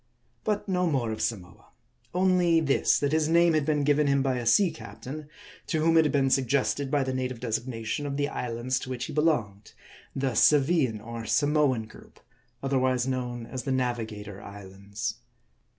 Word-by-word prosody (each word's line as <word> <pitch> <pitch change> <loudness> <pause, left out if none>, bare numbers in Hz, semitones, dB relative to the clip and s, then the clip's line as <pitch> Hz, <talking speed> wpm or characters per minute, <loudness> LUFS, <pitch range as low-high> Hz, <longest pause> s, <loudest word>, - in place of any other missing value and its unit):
"^^ - - -46
v - - -43 0.4
But 210 -1 -1
no 180 -2 +1
more 130 -8 0
of 110 - -4
Samoa; 95 -6 -4 0.5
only 180 -2 +3
this: 145 -4 +2
that 145 -1 0
his 155 0 +1
name 170 0 +4
had 155 -2 +1
been 150 -2 +1
given 145 +1 +3
him 140 -1 +2
by. 130 -2 0
a 120 -2 -3
sea 180 - +4
captain; 140 +3 -9 0.4
to 160 - 0
whom 165 +1 +3
it 160 -1 +6
had 150 - +1
been 135 -2 +2
sug 135 0 +3
gested 140 +1 0
by 145 0 +1
the 130 0 -3
native 130 -2 -3
designation 120 +3 -3
of 140 0 -3
the 145 0 +1
islands 125 -1 -2
to 130 - -8
which 125 -2 -3
he - - -7
belonged; 115 -10 0 0.4
the 135 -1 0
Saviian 140 -2 +3
or 115 -1 -6
Samoan 145 -5 +2
group, 110 - -16 0.4
otherwise 130 -2 +1
known 125 -2 -3
as 130 +2 -5
the 135 - -3
Navigator 110 -6 -3
Islands. 100 +3 -7
130 Hz, 185 wpm, -27 LUFS, 115-150 Hz, 0.5 s, it